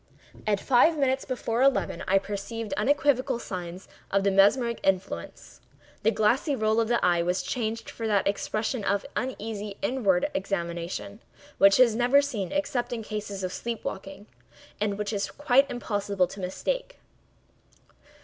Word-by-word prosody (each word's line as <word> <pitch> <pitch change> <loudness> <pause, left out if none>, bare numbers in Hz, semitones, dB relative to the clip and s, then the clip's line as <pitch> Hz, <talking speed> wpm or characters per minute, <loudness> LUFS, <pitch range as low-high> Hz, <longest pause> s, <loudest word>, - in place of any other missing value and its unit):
At 205 -2 +2
five 275 +8 +4
minutes 265 -1 +1
before 245 -2 -2
eleven 275 0 +2
I 195 - +4
perceived 205 +3 -4
unequivocal 270 +1 +2
signs 180 -4 -7 0.2
of 195 0 +1
the 200 - +3
mesmeric 225 +5 +3
influence. 185 - -2 0.4
The 220 - +3
glassy 230 +7 +2
roll 220 -1 +1
of 225 - +2
the 240 +1 +1
eye 175 -1 +3
was 180 +2 0
changed 225 -1 -3
for 225 - -5
that 200 -3 +2
expression 215 +3 -1
of 200 0 0
uneasy 215 -5 -4
inward 200 -9 +1
examination 185 +1 -3 0.4
which 195 +2 +6
is 235 -4 +6
never 245 +4 +4
seen 235 -10 -2
except 280 -4 -1
in 230 -2 -3
cases 205 -2 -5
of 185 - -3
sleep 235 -1 -5
waking, 195 +1 -6 0.5
and 205 -1 -1
which 210 +1 -3
it - - 0
is 200 - -2
quite 275 -1 +3
impossible 205 -6 -1
to 195 +3 -10
mistake. - - -3
215 Hz, 150 wpm, -27 LUFS, 195-245 Hz, 0.5 s, which